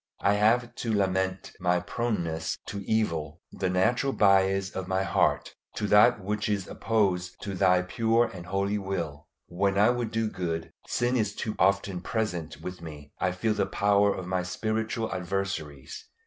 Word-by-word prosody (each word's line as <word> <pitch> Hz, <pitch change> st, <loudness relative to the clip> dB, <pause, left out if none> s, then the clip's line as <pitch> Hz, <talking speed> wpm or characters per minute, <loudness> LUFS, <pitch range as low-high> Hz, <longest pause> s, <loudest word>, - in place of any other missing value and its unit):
I 100 Hz, -, +3 dB
have 115 Hz, +4 st, +2 dB
to 115 Hz, -, -3 dB
lament 95 Hz, -2 st, 0 dB
my 90 Hz, -1 st, +2 dB
proneness 85 Hz, -7 st, -2 dB
to 100 Hz, 0 st, -5 dB
evil, 85 Hz, -8 st, 0 dB
the 95 Hz, -1 st, -2 dB
natural 120 Hz, +9 st, +2 dB
bias 95 Hz, -1 st, +3 dB
of 95 Hz, -1 st, -5 dB
my 95 Hz, 0 st, +1 dB
heart 95 Hz, -, +1 dB, 0.2 s
to 105 Hz, -, -2 dB
that 105 Hz, +3 st, +6 dB
which 105 Hz, +2 st, -2 dB
is 100 Hz, -3 st, -1 dB
opposed 95 Hz, -5 st, 0 dB
to 100 Hz, -, -4 dB
Thy 90 Hz, -1 st, +3 dB
pure 115 Hz, +5 st, +2 dB
and 90 Hz, -6 st, -8 dB
holy 100 Hz, +2 st, 0 dB
will. 85 Hz, -7 st, -4 dB, 0.2 s
When 95 Hz, +3 st, 0 dB
I 105 Hz, +4 st, +5 dB
would 120 Hz, -2 st, -2 dB
do 115 Hz, 0 st, 0 dB
good, 85 Hz, -5 st, -3 dB, 0.2 s
sin 120 Hz, +1 st, 0 dB
is 105 Hz, -4 st, 0 dB
too 110 Hz, -, -3 dB
often 100 Hz, -1 st, +2 dB
present 90 Hz, -7 st, -3 dB
with 90 Hz, -1 st, -7 dB
me. 75 Hz, -3 st, -10 dB
I 95 Hz, -, +1 dB
feel 105 Hz, +5 st, 0 dB
the 105 Hz, -, 0 dB
power 100 Hz, 0 st, +3 dB
of 95 Hz, -, -5 dB
my 90 Hz, 0 st, 0 dB
spiritual 110 Hz, +4 st, -2 dB
adversaries. 90 Hz, -6 st, -4 dB
95 Hz, 165 wpm, -28 LUFS, 90-105 Hz, 0.2 s, that